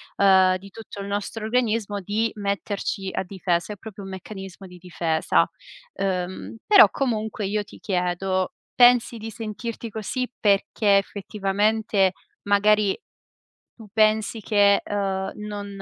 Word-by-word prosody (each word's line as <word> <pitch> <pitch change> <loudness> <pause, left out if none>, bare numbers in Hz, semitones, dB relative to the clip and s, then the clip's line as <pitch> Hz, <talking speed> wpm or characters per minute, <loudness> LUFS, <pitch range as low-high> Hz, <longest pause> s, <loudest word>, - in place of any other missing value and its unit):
uhm, 190 -2 +5
di 195 +1 -13
tutto 215 -2 -9
il 200 - -6
nostro 205 +2 -4
organismo, 220 -3 0
di 215 +4 -1
metterci 200 -1 -3
a - - -1
difesa, 180 0 -2
è - - -9
proprio 210 -1 -10
un 190 - -8
meccanismo 190 0 -9
di 180 -1 -12
difesa. 170 -3 +1 0.5
Ehm, 185 +2 -3
però 405 -3 +8
comunque 220 -4 -2
io 210 +1 -1
ti - - -15
chiedo, 185 0 -1 0.2
pensi 245 -1 +5
di 225 +1 -7
sentirti 230 +1 -6
così 235 +4 -3
perché 200 0 +3
effettivamente, 200 0 0 0.3
magari, 205 0 +3 0.8
tu 220 -3 -13
pensi 220 0 +2
che, 205 -1 +4
uhm, 195 -1 -2
non 210 -1 -6
205 Hz, 130 wpm, -24 LUFS, 190-220 Hz, 0.8 s, però